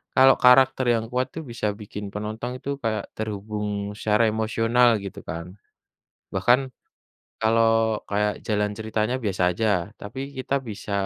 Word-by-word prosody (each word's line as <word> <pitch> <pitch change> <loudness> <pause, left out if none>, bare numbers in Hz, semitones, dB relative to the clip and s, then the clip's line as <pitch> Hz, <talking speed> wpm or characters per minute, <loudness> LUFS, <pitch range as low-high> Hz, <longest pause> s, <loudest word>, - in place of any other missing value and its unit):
kalau 135 0 +7
karakter 130 +1 +6
yang 115 -1 0
kuat 125 +1 0
itu, - - -6
bisa 115 -2 -2
bikin 105 0 -7
penonton 110 +4 -4
itu 135 - -7
kayak 110 -2 -1
terhubung 105 -1 -4
secara 105 +1 +2
emosional, 115 +2 +2 0.2
gitu 100 - -7
kan. 85 -1 -4 0.9
Bahkan 125 +2 +4 0.8
kalau 115 +1 +4 0.4
kayak 105 +1 +1
jalan 105 -1 +1
ceritanya 110 +2 -1
biasa 100 -3 -1
aja, 110 +5 -1 0.3
tapi 115 +6 -7 0.2
kita 130 +1 -2
bisa, 105 -1 -6
110 Hz, 135 wpm, -24 LUFS, 105-120 Hz, 0.9 s, kalau